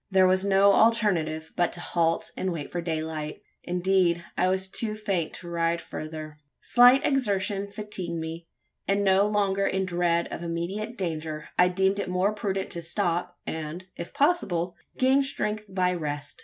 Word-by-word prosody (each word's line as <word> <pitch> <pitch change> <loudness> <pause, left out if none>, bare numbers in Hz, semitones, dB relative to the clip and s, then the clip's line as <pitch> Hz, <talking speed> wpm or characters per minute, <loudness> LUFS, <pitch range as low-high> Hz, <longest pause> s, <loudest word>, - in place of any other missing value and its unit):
There 190 -1 +5
was 185 +1 +3
no 200 0 +5
alternative 180 -9 +2
but 175 -1 +2
to 175 - -6
halt 165 -1 0
and 185 - -2
wait 155 -4 -5
for 175 - -2
daylight. 160 -2 -4 0.2
Indeed, 180 -1 +1
I - - +2
was 190 +1 +1
too 215 +2 -1
faint 195 -6 -1
to 175 - -8
ride 170 0 0
further. 155 -2 -7 0.2
Slight 245 +3 +6
exertion 200 -6 0
fatigued 195 -5 -5
me; 165 +1 -6 0.4
and, 200 +1 +2
no 195 +1 +4
longer 200 -2 +1
in 190 0 0
dread 175 -1 +1
of - - -5
immediate 175 +7 -4
danger 155 -4 -4
I 180 - +5
deemed 190 +2 +1
it 200 - -3
more 185 +3 +1
prudent 195 -3 -3
to 170 - -3
stop, 175 +1 -1
and, 160 +3 -5
if 170 - -7
possible, 190 - +1 0.2
gain 265 +2 +4
strength 215 -6 -2
by 185 -1 +1
rest. 145 -4 -5
180 Hz, 165 wpm, -26 LUFS, 170-200 Hz, 0.4 s, Slight